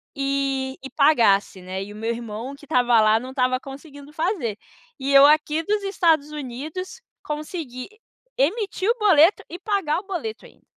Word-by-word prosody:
e 275 Hz, -1 st, -1 dB
e 270 Hz, -, -7 dB
pagasse, 225 Hz, -10 st, +3 dB
né, 185 Hz, +1 st, -5 dB
e 205 Hz, -, -10 dB
o -, -, -11 dB
meu 225 Hz, +2 st, -3 dB
irmão 230 Hz, +2 st, -6 dB
que 290 Hz, -, -16 dB
estava 245 Hz, -5 st, +3 dB
lá 215 Hz, +1 st, +4 dB
não 255 Hz, +2 st, -8 dB
estava 255 Hz, -1 st, 0 dB
conseguindo 285 Hz, +2 st, -12 dB
fazer. 315 Hz, -, -2 dB, 0.4 s
E 275 Hz, +1 st, -2 dB
eu 275 Hz, 0 st, +8 dB
aqui 305 Hz, +1 st, +3 dB
dos 415 Hz, +3 st, 0 dB
Estados 330 Hz, -7 st, +1 dB
Unidos 300 Hz, -, -7 dB, 0.2 s
consegui 300 Hz, -4 st, -6 dB, 0.5 s
emitir 390 Hz, -, 0 dB
o 465 Hz, -, +3 dB
boleto 370 Hz, -3 st, +5 dB
e 350 Hz, -, -7 dB
pagar 380 Hz, -5 st, -1 dB
o 385 Hz, -, -13 dB
boleto 390 Hz, +3 st, -5 dB
ainda. -, -, -19 dB
280 Hz, 165 wpm, -23 LUFS, 250-330 Hz, 0.5 s, eu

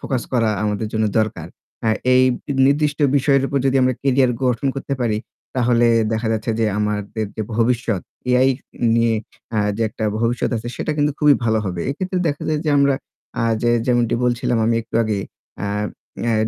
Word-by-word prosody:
Focus 130 Hz, -4 st, -2 dB
করা 115 Hz, -3 st, +2 dB
আমাদের 105 Hz, +1 st, -1 dB
জন্য 110 Hz, 0 st, +1 dB
দরকার। 105 Hz, -7 st, -1 dB, 0.4 s
হ্যাঁ 110 Hz, -1 st, +2 dB, 0.2 s
এই 130 Hz, -, +6 dB, 0.4 s
নির্দিষ্ট 145 Hz, +1 st, +1 dB, 0.2 s
বিষয়ের 135 Hz, 0 st, +3 dB
উপর 140 Hz, 0 st, 0 dB
যদি 135 Hz, 0 st, +2 dB
আমরা 130 Hz, -1 st, +2 dB
কেরিয়ার 130 Hz, -2 st, +3 dB
গঠন 125 Hz, +2 st, +1 dB
করতে 135 Hz, 0 st, -3 dB
পারি, 110 Hz, -3 st, +1 dB, 0.4 s
তাহলে 120 Hz, -1 st, +3 dB, 0.3 s
দেখা 110 Hz, 0 st, -1 dB
যাচ্ছে 110 Hz, +1 st, -2 dB
যে -, -, +3 dB
আমাদের 105 Hz, +1 st, -2 dB
যে 110 Hz, -, -1 dB
ভবিষ্যৎ, 115 Hz, -4 st, +1 dB, 0.3 s
AI 125 Hz, +1 st, +4 dB, 0.5 s
নিয়ে 115 Hz, -1 st, +3 dB, 0.4 s
আ -, -, +3 dB, 0.2 s
যে 115 Hz, -, -1 dB
একটা 110 Hz, 0 st, -5 dB, 0.2 s
ভবিষ্যৎ 120 Hz, +1 st, 0 dB
আছে, 115 Hz, +2 st, -5 dB
সেটা 155 Hz, -, -2 dB
কিন্তু 150 Hz, 0 st, +2 dB
খুবই 150 Hz, -1 st, +5 dB
ভালো 110 Hz, -1 st, +2 dB
হবে। 90 Hz, -3 st, -3 dB
এক্ষেত্রে 185 Hz, +5 st, -2 dB
দেখা 145 Hz, -1 st, -3 dB
যায় 155 Hz, -1 st, 0 dB
যে 155 Hz, -, +1 dB
আমরা 140 Hz, -1 st, +4 dB, 0.5 s
আ -, -, +1 dB, 0.2 s
যে, 120 Hz, -, +3 dB, 0.2 s
যেমনটি 120 Hz, -2 st, +2 dB
বলছিলাম 120 Hz, -1 st, +1 dB
আমি 115 Hz, -, +2 dB
একটু 115 Hz, -, -19 dB
আগে 110 Hz, -2 st, -1 dB, 0.5 s
আ -, -, -1 dB, 0.6 s
অ্যা 115 Hz, -1 st, +1 dB
120 Hz, 180 wpm, -20 LUFS, 110-135 Hz, 0.6 s, এই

